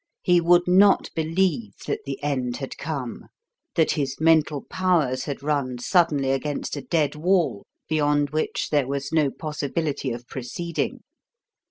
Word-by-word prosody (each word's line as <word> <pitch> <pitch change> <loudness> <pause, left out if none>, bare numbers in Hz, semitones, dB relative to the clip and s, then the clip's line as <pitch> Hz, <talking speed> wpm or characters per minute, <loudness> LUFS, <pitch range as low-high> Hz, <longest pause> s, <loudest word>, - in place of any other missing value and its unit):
He 175 -1 +4
would 175 +1 +4
not 195 +3 +5
believe 160 - 0
that - - -3
the 135 - -3
end 130 -4 -1
had 135 - -6
come, 140 -6 -5 0.5
that 160 - +3
his 140 -3 -2
mental 155 -3 +3
powers 165 -9 0
had 140 -1 -5
run 140 -4 -1
suddenly 145 -1 +2
against 140 +3 -2
a 145 - -4
dead 155 -2 0
wall 170 - +1 0.2
beyond 145 -2 +1
which 155 +1 -1
there 145 -4 +2
was 140 +1 -3
no 155 -3 +3
possibility 150 -1 -3
of 120 0 -5
proceeding. 165 +7 -4
150 Hz, 145 wpm, -24 LUFS, 135-165 Hz, 0.5 s, not